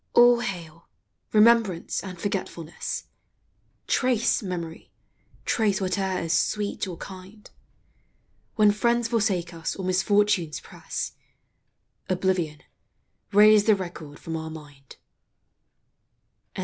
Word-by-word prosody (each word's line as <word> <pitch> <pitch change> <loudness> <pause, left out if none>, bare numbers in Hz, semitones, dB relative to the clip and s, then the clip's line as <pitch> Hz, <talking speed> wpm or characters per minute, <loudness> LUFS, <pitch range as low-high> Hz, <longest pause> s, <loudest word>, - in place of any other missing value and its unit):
All 240 0 +7
hail, 170 -7 -6 0.4
Remembrance 215 -5 +3
and 185 -3 -8
Forgetfulness! 175 -4 -4 0.8
Trace, 250 -3 +2
Memory, 170 -4 -6 0.6
trace 210 -4 +2
whate'er 190 0 -1
is 165 0 -1
sweet 205 +2 0
or 175 -3 -6
kind: 190 +2 -11 1.1
When 210 -2 +5
friends 235 +2 +1
forsake 195 -7 0
us 165 -1 -4
or 190 - -5
misfortunes 185 -3 +2
press, - - -6 1.0
Oblivion, 180 -5 0 0.7
'rase 210 0 +7
the 215 - +5
record 170 -6 -7
from 165 - -6
our 160 0 -4
mind. 145 -4 -12
190 Hz, 95 wpm, -25 LUFS, 170-210 Hz, 1.1 s, All